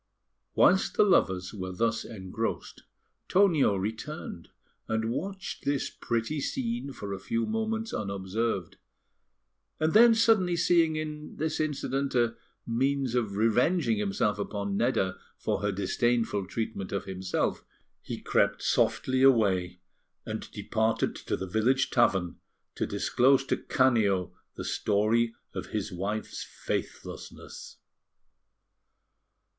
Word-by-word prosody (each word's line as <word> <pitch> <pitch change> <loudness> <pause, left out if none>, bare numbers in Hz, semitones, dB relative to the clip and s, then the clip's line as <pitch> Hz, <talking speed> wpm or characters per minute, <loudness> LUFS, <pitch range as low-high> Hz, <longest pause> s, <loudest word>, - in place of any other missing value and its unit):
Whilst 190 +1 +4
the - - +7
lovers 95 - +2
were 95 -3 -5
thus 115 +3 0
engrossed, 95 -4 -5 0.5
Tonio 175 - +4
returned, 110 - -5 0.4
and 110 0 -1
watched 190 +8 -5
this 140 -1 -1
pretty 120 +6 -2
scene 235 - -2
for 100 -6 -6
a 95 - -5
few 115 +4 -1
moments 225 0 -2
unobserved; 100 -1 -2 1.0
and 155 0 +1
then 230 +1 +8
suddenly 220 -6 +3
seeing 165 -2 +3
in 150 -1 -5
this 155 0 -2
incident 140 -3 -1
a 120 -2 +2 0.3
means 135 +2 0
of 110 -5 -1
revenging 115 - +2
himself 105 +1 0
upon 100 -1 -3
Nedda 95 -5 0 0.2
for - - -2
her 105 0 +1
disdainful 105 +1 0
treatment 110 -3 -4
of 100 - -2
himself, 95 -1 -2 0.4
he - - -6
crept - - +1
softly 130 0 +1
away, 95 -9 +3 0.4
and - - -5
departed 110 0 0
to - - -3
the 95 - -4
village 115 +8 +1
tavern 95 -8 +2 0.4
to - - -2
disclose 135 +2 +3
to - - +1
Canio 105 - +2 0.2
the - - -6
story 110 +3 +1 0.2
of - - -5
his - - -3
wife's 100 +4 -3
faithlessness. - - -6
115 Hz, 120 wpm, -28 LUFS, 100-150 Hz, 1.0 s, then